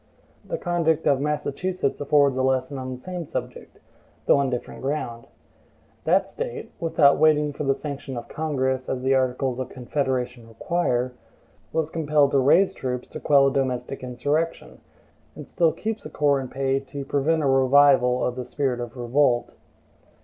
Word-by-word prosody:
The - - -4
conduct 165 - 0
of 140 -1 +3
Massachusetts 150 +3 -2
affords 145 -2 +3
a 130 - 0
lesson 130 +1 0
on 130 0 -5
the 130 - -5
same 180 +6 -6
subject, 150 - -7 0.5
though - - +5
on 140 -1 +1
different 125 -1 -5
ground. 130 -4 -3 0.8
That - - +3
State 480 -2 -6
(without 155 -4 +4
waiting 150 -1 +3
for 145 - -4
the 135 0 +2
sanction 140 -3 -6
of 120 - -7
Congress, 130 -4 -2
as 130 -1 -3
the 135 +1 +3
articles 130 -1 0
of 130 - -3
the - - -16
Confederation 125 -2 -2
require) 125 -1 -1 0.6
was 160 -1 -1
compelled 150 -3 +2
to 140 - +3
raise 180 +9 +4
troops 125 -6 -4
to - - -7
quell 140 -2 +4
a 135 - +2
domestic 130 -1 -2
insurrection, 145 +7 -2 0.6
and - - -9
still 170 -3 +2
keeps 220 +4 -4
a - - -7
corps 145 -2 +2
in 130 - -5
pay 135 +1 -1
to 140 +1 -8
prevent 150 +3 +1
a - - +2
revival 135 -1 +4
of 125 - -2
the 125 - -4
spirit 125 0 -2
of 120 +1 -7
revolt. 120 0 +1
135 Hz, 170 wpm, -24 LUFS, 130-150 Hz, 0.8 s, though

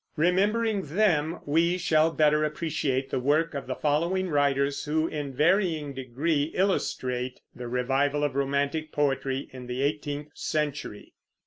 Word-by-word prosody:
Remembering 200 +6 +2
them, 170 -6 +2
we 165 +4 +2
shall 160 -3 +3
better 150 -1 +3
appreciate 150 -4 -1
the - - 0
work 150 +6 +1
of 140 -3 -5
the 130 - -2
following 170 +5 0
writers 140 -1 +1
who, 155 +2 +1
in 145 -3 -4
varying 160 0 +1
degree, 140 +4 -1
illustrate 130 -9 -1
the 120 0 -6
revival 135 +4 0
of 145 - 0
romantic 140 +3 -1
poetry 135 -2 -1
in 125 -1 -9
the 125 +2 -2
eighteenth 145 0 -2
century. 145 -8 -3
150 Hz, 135 wpm, -27 LUFS, 135-165 Hz, -, shall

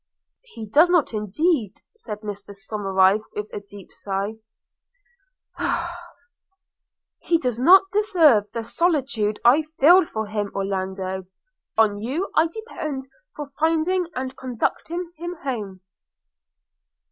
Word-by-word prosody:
'He 450 - -10
does 300 - +5
not 350 -9 +2
indeed,' 215 - 0 0.2
said 215 - -8
Mr 205 -1 -7
Somerive 195 -1 +2
with 210 - -3
a - - -3
deep 200 -1 -14
sigh 200 +2 -3 1.1
– 345 +1 -8
'he 340 - +2
does 250 -7 -2
not 365 +9 +7
deserve 330 - +4
the 230 0 -4
solicitude 260 -7 0
I 255 +6 +6 0.2
feel 340 +4 +7
for 220 0 -3
him. 210 -1 -3
Orlando, 190 -1 -3 0.5
on 210 -2 +3
you 275 - -3
I 320 - +4
depend 305 - -6 0.3
for 290 -2 -7
finding 330 +3 +1
and 260 0 -4
conducting 320 +8 -3
him 345 +2 -5
home.' 210 -9 -4
255 Hz, 115 wpm, -23 LUFS, 205-335 Hz, 1.1 s, not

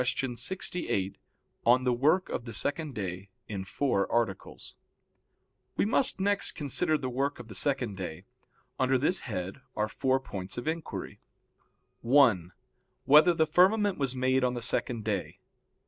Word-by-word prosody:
_______________________ - - +2
QUESTION 125 0 -1
68 120 - -2 0.4
ON 125 +2 +4
THE 125 -1 +2
WORK 155 +10 +2
OF 120 - -4
THE 115 - -7
SECOND 145 -1 0
DAY 95 -1 -5 0.2
(In 100 -3 -4
Four 100 0 -1
Articles) 115 -5 -2 1.0
We - - +2
must 240 0 +2
next 200 +1 +1
consider 155 +2 0
the 130 - -4
work 135 +3 -1
of 120 -2 -11
the - - -8
second 125 -3 -1
day. 85 -4 -6 0.5
Under 130 0 +3
this 150 +8 +1
head 95 -3 -5
there - - -24 0.2
are - - 0
four 130 +4 0
points 95 -7 -7
of 120 - -5
inquiry: 160 0 -4 0.8
(1) 115 -9 +4 0.5
Whether 155 +5 +6
the 160 - +3
firmament 195 +3 +3
was 135 -2 -1
made 130 +1 +1
on 125 0 +1
the 120 - -5
second 115 -1 -1
day? 100 -4 -3
130 Hz, 160 wpm, -29 LUFS, 110-150 Hz, 1.0 s, Whether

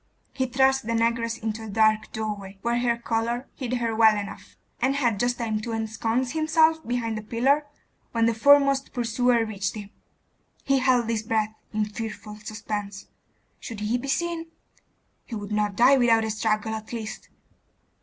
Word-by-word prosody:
He 260 -1 -1
thrust 265 0 +2
the 230 - 0
negress 230 0 0
into 220 0 -4
a 220 - -7
dark 215 +1 +2
doorway, 205 -3 -5
where 235 0 +1
her 240 -1 +1
colour 235 +2 -2
hid 250 -3 -4
her 235 -2 -1
well 220 -1 +5
enough, 200 -1 -8 0.2
and 270 +1 +2
had 240 -7 +1
just 245 0 +1
time 220 -3 -2
to 230 +1 -4
ensconce 225 +3 -1
himself 315 0 +3
behind 230 -2 -1
a - - -7
pillar, 265 +7 +1 0.4
when 230 -1 +2
the 230 - +3
foremost 275 +3 +4
pursuer 240 -1 +2
reached 200 -2 -3
him. 205 -1 -8 0.7
He 275 -1 +2
held 255 -3 +3
his 225 -2 0
breath 220 -1 -1 0.2
in 215 -1 0
fearful 215 0 -7
suspense. 210 -2 -6 0.5
Should 225 -4 -7
he 225 +4 0
be 275 - -6
seen? 335 +3 -1 0.8
He 235 - -7
would 205 -1 -6
not 210 -1 0
die 260 +5 +6
without 230 -3 +4
a 220 - -2
struggle 215 0 0
at 220 0 -6
least. 225 -2 -6
230 Hz, 170 wpm, -25 LUFS, 215-250 Hz, 0.8 s, die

